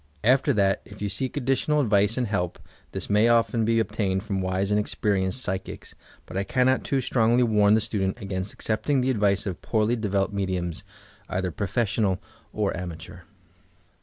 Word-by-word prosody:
After 130 +5 +4
that, 100 -3 +2
if 105 - -13
you 105 - -2
seek 130 +9 -3
additional 140 +3 +1
advice 105 -3 +2
and 125 - +1
help, 90 -5 -2 0.3
this - - -5
may 105 +3 +4
often 115 -1 +3
be 115 +1 +2
obtained 95 -4 0
from 100 -3 -2
wise 95 +2 -1
and 105 - +3
experienced 100 +1 -1
psychics, 95 -2 -5 0.3
but - - -10
I 100 - 0
cannot 130 +5 +2
too 135 -1 0
strongly 120 0 +3
warn 105 -2 +4
the 110 - +2
student 100 -1 -2
against 95 -2 -4
accepting 130 +5 0
the 130 +1 +1
advice 100 -2 +1
of 95 -4 -4
poorly 110 +1 +1
developed 100 -2 -1
mediums, 90 -4 -2 0.5
either 95 -1 -1
professional 100 0 0 0.3
or - - -1
amateur. 90 0 -7
105 Hz, 165 wpm, -25 LUFS, 95-115 Hz, 0.5 s, After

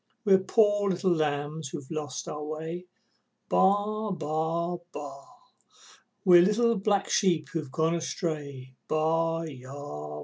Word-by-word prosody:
We're 195 -2 +6
poor 205 0 +3
little 185 0 +1
lambs 150 -1 -2
who've 145 -2 -8
lost 155 -2 -4
our 150 0 -5
way, 160 +4 -5 0.6
Baa! 210 +2 +2
Baa! 165 0 -1
Baa! 140 -2 -8 1.0
We're 175 -2 +8
little 230 +5 +3
black 200 0 +1
sheep 175 -6 +2
who've 155 -5 -4
gone 160 +4 +1
astray, 150 -6 -4
Baa 165 +1 +1
aa 130 -5 -9
aa! 75 - -7
160 Hz, 125 wpm, -28 LUFS, 150-185 Hz, 1.0 s, We're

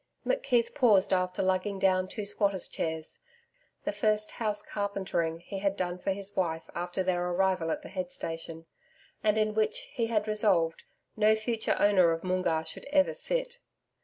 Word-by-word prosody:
McKeith 250 - +1
paused 220 -10 +4
after 185 0 0
lugging 190 +2 0
down 185 -1 +2
two 210 +2 -5
squatters' 200 -2 0
chairs 160 -1 -4 0.6
the - - -1
first 215 -2 +1
house 210 -2 +1
carpentering 190 -6 -2
he 195 +2 -6
had 195 0 0
done 180 0 -2
for 195 - -1
his 200 +1 -4
wife 165 -3 0
after 175 +2 -2
their 180 -1 0
arrival 185 -2 +1
at - - -2
the - - -9
head 185 -2 -4
station, 165 0 -5 0.6
and 215 0 +3
in 215 0 +2
which, 220 - +1
he 230 -2 0
had 215 -2 0
resolved, 195 -6 +2 0.3
no 215 0 +4
future 220 0 0
owner 190 -4 +5
of 165 - -5
Moongarr 185 -3 0
should 160 - -6
ever 285 0 +3
sit. - - -2
195 Hz, 165 wpm, -29 LUFS, 180-215 Hz, 0.6 s, owner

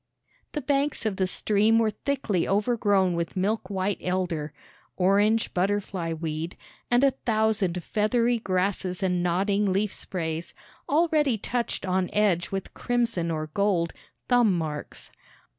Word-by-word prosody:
The 300 - -2
banks 280 -2 0
of 205 -3 -1
the 190 - +1
stream 215 +4 +2
were 225 -1 +3
thickly 215 -6 -1
overgrown 205 -3 +2
with 170 +1 -3
milk 195 +1 0
white 195 0 -1
elder, 180 -5 -2 0.5
orange 205 +4 +3
butterfly 190 -2 -1
weed, 160 +1 -4 0.3
and 245 +2 +3
a 275 - +5
thousand 215 -8 0
feathery 230 +4 +1
grasses 185 -1 -1
and 180 -2 +1
nodding 195 +3 +1
leaf 200 +2 0
sprays, 165 -2 -4 0.3
already 300 -5 +3
touched 235 0 -2
on 185 -1 0
edge 190 -5 +2
with 195 -1 -5
crimson 230 -8 0
or 155 -1 -3
gold 190 -5 +1 0.3
"thumb 240 -7 +4
marks." 155 -3 -5
195 Hz, 130 wpm, -26 LUFS, 180-225 Hz, 0.5 s, a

